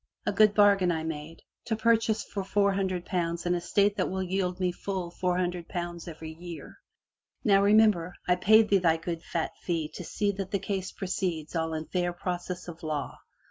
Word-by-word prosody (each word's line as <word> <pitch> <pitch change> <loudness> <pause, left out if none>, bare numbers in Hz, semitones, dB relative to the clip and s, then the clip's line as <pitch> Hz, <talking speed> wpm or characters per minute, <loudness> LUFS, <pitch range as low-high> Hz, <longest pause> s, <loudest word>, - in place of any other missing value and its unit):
A - - +1
good 215 -1 +4
bargain 200 -3 +5
I 160 -1 -2
made 160 0 -6
— - - -53
to 225 - +1
purchase 225 -1 +2
for 200 - -5
four 200 +1 +2
hundred 185 -2 -1
pounds 170 -2 -2
an 175 - +2
estate 200 +4 +1
that 185 - 0
will 190 0 -2
yield 185 0 -1
me 180 -1 +1
full 180 -1 -4
four 180 0 0
hundred 175 -1 -2
pounds 175 0 -5
every 160 -1 -7
year. 170 0 -9 0.6
Now, 200 -5 +5
remember, 200 -4 +4
I 180 - +4
paid 215 +4 +5
thee 200 - +5
thy 165 -2 +3
good 165 0 -4
fat 165 -1 -2
fee 165 -4 -2
to 180 - -8
see 205 +4 0
that 195 -1 -5
the 200 - 0
case 195 -1 -3
proceeds 180 -4 -3
all 160 -1 -1
in 155 0 -4
fair 175 0 -1
process 180 0 -4
of 165 -2 -9
law. 155 -3 -4
180 Hz, 200 wpm, -28 LUFS, 170-200 Hz, 0.6 s, bargain